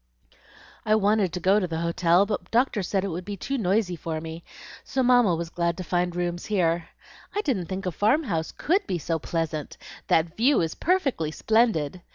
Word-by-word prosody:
"I 215 - +3
wanted 205 -3 +2
to 180 - -3
go 190 +4 +4
to 185 - -1
the 165 -1 -3
hotel, 170 +2 +3
but 205 -3 -3
the - - -26
doctor 240 -2 +2
said 190 +1 -1
it 200 - -2
would 175 +1 -4
be 200 +1 -6
too 275 +9 -3
noisy 190 -2 +1
for 160 -1 -4
me, 160 +1 -8 0.4
so 260 - -1
Mamma 245 -7 +4
was 165 0 -5
glad 170 -1 -1
to 185 - -4
find 175 0 -1
rooms 175 0 -3
here. 170 -5 0 0.5
I 415 - +1
didn't 220 - -1
think 190 +1 -5
a 180 - -1
farm 220 - +2
house 165 - -2
COULD 380 +6 0
be 180 - -1
so 165 +1 -2
pleasant. 160 -1 -3 0.3
That 165 +1 +2
view 260 +6 +3
is 160 -1 -1
perfectly 285 - 0
splendid!" 185 -4 +1
180 Hz, 200 wpm, -25 LUFS, 170-215 Hz, 0.5 s, go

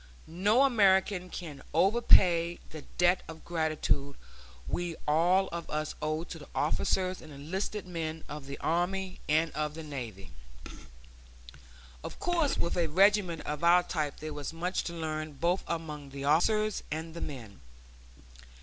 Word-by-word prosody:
No 205 +10 +3
American 195 -6 +3
can 150 -7 -7
overpay 175 -3 +5
the 155 - -7 0.2
debt 175 +1 +4
of 160 0 -10
gratitude 155 -4 -1 0.5
we 175 - -2
all 175 +5 +4
of 170 -1 -6
us 155 0 -2
owe 155 +1 -1
to 170 -1 -8
the 145 - -12
officers 185 +4 0
and 155 - -12
enlisted 185 +8 -4
men 160 -3 -4
of 145 -1 -7
the 140 - -6
army 185 +3 -1
and 160 +1 +3
of 150 0 -3
the 160 - -6
navy. 115 - -7 1.7
Of - - -7
course 340 -5 +1
with 170 - -1
a 170 -2 +2
regiment 190 0 +3
of 150 +2 -4
our 175 +1 +6
type 150 -5 -2
there 155 0 -6
was 145 -1 -5
much 175 +3 -2
to 170 - -4
learn 155 -2 -4
both 170 +6 0
among 150 -4 -4
the 135 0 -7
officers 215 +8 +2
and 160 +1 -4
the 170 - -7
men. 120 -9 -7
165 Hz, 150 wpm, -30 LUFS, 150-185 Hz, 1.7 s, our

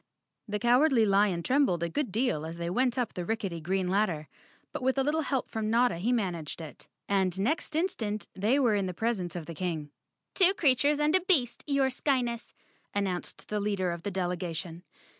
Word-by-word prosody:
The 210 0 -1
Cowardly 245 +1 +4
Lion 195 -3 +2
trembled 255 - +2
a - - +1
good 255 - -2
deal 225 - 0
as 165 +1 -6
they 170 0 -3
went 250 +4 +1
up 245 -3 -1
the 180 - -4
rickety 195 -4 -3
green 185 +3 -1
ladder, 180 -6 0 0.4
but - - -5
with 260 +1 +1
a 270 - +3
little 305 +3 +1
help 275 -3 -1
from 220 -1 -2
Notta 235 -5 +3
he 210 +8 0
managed 180 -11 -2
it, 160 -3 -10 0.2
and 190 -2 +1
next 300 +8 -1
instant 240 - -1
they 210 +8 +2
were 245 -6 +3
in 200 -2 +1
the 180 - -5
presence 190 -5 -2
of 170 -3 -5
the 170 - -7
King. 160 -4 -3 0.4
"Two 380 0 +4
creatures 285 -2 +3
and 300 +3 +3
a 375 - +4
beast, 310 -10 +2
your 275 -2 +2
Skyness!" 250 -3 -1 0.4
an¬ 205 0 +1
nounced 180 -1 -5
the 210 - -2
leader 200 -3 0
of 170 -1 -5
the 205 - -3
delegation. 175 -2 -3
210 Hz, 195 wpm, -29 LUFS, 180-255 Hz, 0.4 s, Cowardly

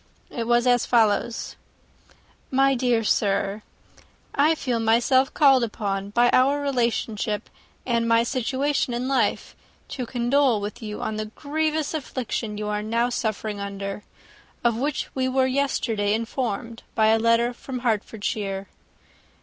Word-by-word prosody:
It 230 -2 -4
was 240 0 +3
as 245 -1 +4
follows: 230 0 +1 0.5
/* - - -27 0.4
"My 275 0 +5
dear 245 -3 +1
Sir, 200 -1 +1 0.4
*/ - - -29
"I 305 +3 +3
feel 250 -6 -1
myself 240 +4 +3
called 270 -4 +5
upon, 200 -3 -3
by 240 +3 +3
our 275 +3 +4
relationship, 235 -6 -1 0.3
and 235 -2 +1
my 230 0 +4
situation 260 +1 -1
in 250 +2 -2
life, 270 0 0 0.3
to 250 -3 -4
condole 245 0 +2
with 205 +3 -6
you 210 -1 -5
on 220 0 -3
the 215 - -2
grievous 305 +6 -2
affliction 250 -7 -4
you 210 0 -3
are 210 0 -1
now 230 +3 0
suffering 215 -3 -3
under, 200 0 -5 0.6
of 235 -2 +3
which 280 +5 -2
we 260 -1 0
were 260 0 +2
yesterday 240 -6 0
informed 230 -1 -3
by 220 -1 +4
a 225 0 +4
letter 230 +2 +3
from 255 0 -7
Hertfordshire. 205 -3 -2
235 Hz, 140 wpm, -24 LUFS, 215-260 Hz, 0.6 s, My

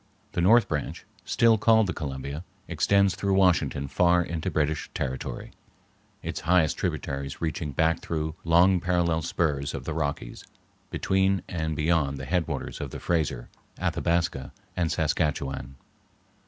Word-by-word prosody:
The 85 - -1
north 115 +7 +5
branch, 75 -3 -4 0.2
still 115 -2 +4
called 110 0 +5
the 90 - -2
Columbia, 70 0 -5 0.2
extends 100 -1 +3
through 95 +1 0
Washington 80 -7 +2
far 90 +4 +3
into 85 -2 -3
British 75 0 -1
territory, 65 0 -4 0.7
its - - -4
highest 85 -2 +3
tributaries 70 0 -3
reaching 80 -2 -2
back 80 +4 +2
through 80 -1 -3
long 90 +3 +5
parallel 85 -2 +1
spurs 75 -4 -1
of - - -5
the 80 - -4
Rockies 70 -6 -3 0.5
between 95 0 +1
and 80 -3 -2
beyond 75 -2 +1
the 65 - -6
headwaters 85 +3 -2
of - - -4
the - - -7
Fraser, 80 -8 -1 0.3
Athabasca, 85 -6 0 0.2
and 85 -3 0
Saskatchewan. 70 -4 -1
80 Hz, 135 wpm, -26 LUFS, 70-90 Hz, 0.7 s, north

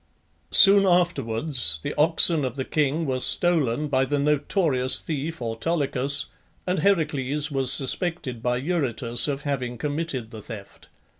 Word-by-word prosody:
Soon 195 0 +7
afterwards 135 - 0
the - - -4
oxen 160 0 +3
of 130 -2 -4
the 130 -2 -4
king 155 +2 -1
were 130 -2 -2
stolen 150 -3 +1
by 135 -2 +1
the 145 +2 -2
notorious 145 -2 +1
thief 155 -2 -5
Autolycus, 140 +3 -1 0.4
and 180 +1 -1
Heracles 150 -6 0
was 135 -2 0
suspected 135 -3 -1
by 125 0 -1
Eurytus 130 -6 0
of 140 -1 -4
having 125 -4 -4
committed 145 -5 -4
the 110 -2 -10
theft. 105 -2 -12
140 Hz, 135 wpm, -23 LUFS, 125-160 Hz, 0.4 s, Soon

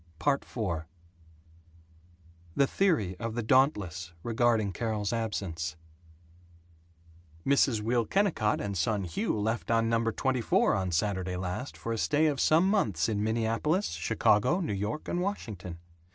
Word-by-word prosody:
IV 140 -3 -1 2.0
The 140 - +4
theory 140 - +1
of 115 -1 -4
the 120 - -2
Dauntless 105 - +1
regarding 115 -3 +1
Carol's 110 +1 -2
absence: 90 -8 -3 1.7
Mrs. 135 -5 +3
Will 115 +1 +1
Kennicott 190 - +1
and 100 -1 -3
son 100 +3 0
Hugh 85 +4 -2
left 110 +2 -2
on 115 0 +2
No. 115 0 +1
24 125 0 +1
on 95 -1 -1
Saturday 95 0 -1
last 90 +9 -4
for 115 - -3
a 115 - -3
stay 150 +6 +2
of 145 -3 +1
some 165 +4 +4
months 170 - +1
in 105 -2 -1
Minneapolis, 115 - 0
Chicago, 110 - +2
New 165 - -2
York 105 +9 -3
and 175 - -1
Washington. 105 - -4
115 Hz, 130 wpm, -29 LUFS, 100-135 Hz, 2.0 s, The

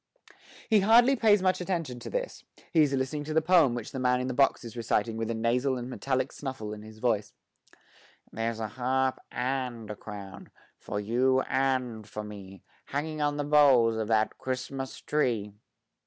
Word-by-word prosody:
He 220 -2 +5
hardly 235 +6 +6
pays 210 -5 +4
much 185 -1 +2
attention 165 -9 -3
to - - -7
this; - - -4 0.3
he 160 - +5
is 145 -2 +3
listening 135 +2 -1
to 155 +1 -4
the - - +6
poem 160 -7 +4
which 120 -3 -6
the 130 - -5
man 125 0 +2
in 125 - -2
the 130 - -2
box 135 0 +2
is 115 -1 -9
reciting 115 -1 0
with 115 0 -3
a 115 - -1
nasal 125 +4 +1
and 125 +1 -6
metallic 130 0 -1
snuffle 130 -7 -6
in 105 - -8
his 110 0 -12
voice: 110 -3 0 1.0
There's 115 0 -3
a 110 - -2
harp 130 +3 0
and 125 -4 -3
a - - -5
crown, 100 -2 -9 0.3
For 105 - -4
you 125 +5 +2
and 130 -5 -1
for 105 - -5
me, 100 -3 -10 0.2
Hanging 155 +2 -3
on 145 0 0
the 145 - -1
boughs 140 -6 +5
Of 110 -1 -2
that 110 -1 +1
Christmas 130 +1 -4
tree! 115 -9 0
130 Hz, 185 wpm, -28 LUFS, 115-145 Hz, 1.0 s, hardly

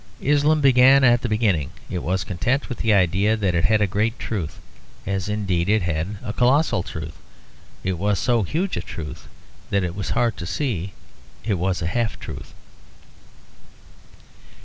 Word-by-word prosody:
Islam 150 +2 +2
began 135 0 +6
at 120 -1 +5
the 120 - -2
beginning; 105 - +1 0.2
it 90 - -4
was 95 0 -1
content 120 - -1
with 125 - -5
the 115 - +2
idea 100 +3 +3
that 100 -4 0
it 85 +1 +2
had 110 +1 +3
a - - +4
great 105 +5 -1
truth; 95 -12 -4 0.5
as 95 0 -2
indeed 100 -4 -1
it 105 -2 +3
had 90 +4 -2
a 105 - -4
colossal 125 - +2
truth. 80 -3 -7 0.7
It 95 -2 -2
was 100 +1 +1
so 120 +4 +2
huge 170 - -1
a - - -1
truth 75 -2 -8 0.4
that 100 -1 +1
it 90 -1 -2
was 100 +1 -4
hard 120 -2 +1
to 85 - -6
see 95 - -2 0.5
it 110 - 0
was 90 0 -1
a - - -2
half 110 +6 -1
truth. - - -9
105 Hz, 170 wpm, -22 LUFS, 90-120 Hz, 0.7 s, began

